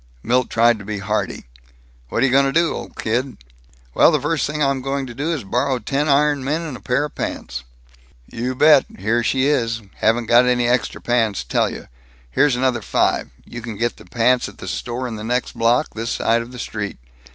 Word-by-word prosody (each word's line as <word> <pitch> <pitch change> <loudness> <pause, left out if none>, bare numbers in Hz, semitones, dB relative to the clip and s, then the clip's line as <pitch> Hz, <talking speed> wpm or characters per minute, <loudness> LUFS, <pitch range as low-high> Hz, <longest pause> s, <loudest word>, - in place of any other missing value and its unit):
Milt 125 +1 +1
tried 115 0 +3
to - - -9
be 105 +1 -4
hearty: 100 -8 -2 0.6
"What're - - 0
you 135 - +3
going 135 +1 +4
to - - 0
do, 165 +2 +2
old - - -7
kid?" 120 +2 -2 0.6
"Well, - - +6
the 155 - +2
first 150 +1 0
thing 150 +1 -4
I'm 135 -1 +1
going 135 +1 -2
to 125 - -8
do 145 +7 -2
is 155 -5 -2
to - - -13
borrow 130 +6 0
ten 140 +4 -1
iron 145 0 +3
men 150 +5 -1
and 155 -6 -5
a - - -9
pair 130 +4 0
of 150 - -9
pants." 60 0 -5 0.6
"You 125 - -4
bet! 150 +1 +6
Here 110 +5 +1
she 130 +2 +1
is. 115 -6 0
Haven't 115 +2 +2
got 120 +2 +5
any 125 -1 +2
extra 125 0 0
pants. 115 - +1
Tell - - +1
you: - - -9 0.4
Here's 135 - +3
another 125 -1 0
five, - - 0 0.2
and - - -17
you 120 - -5
can 115 -2 -7
get 120 +2 -1
the - - -14
pants 125 +1 +2
at - - -16
the - - -9
store 125 +1 -3
in 115 -3 -5
the 105 - -7
next 125 +3 -2
block, 120 +5 +2
this 115 +1 -4
side 115 +1 +1
of 115 +1 -9
the 125 - -9
street. 105 -4 -4
125 Hz, 220 wpm, -20 LUFS, 115-135 Hz, 0.6 s, Well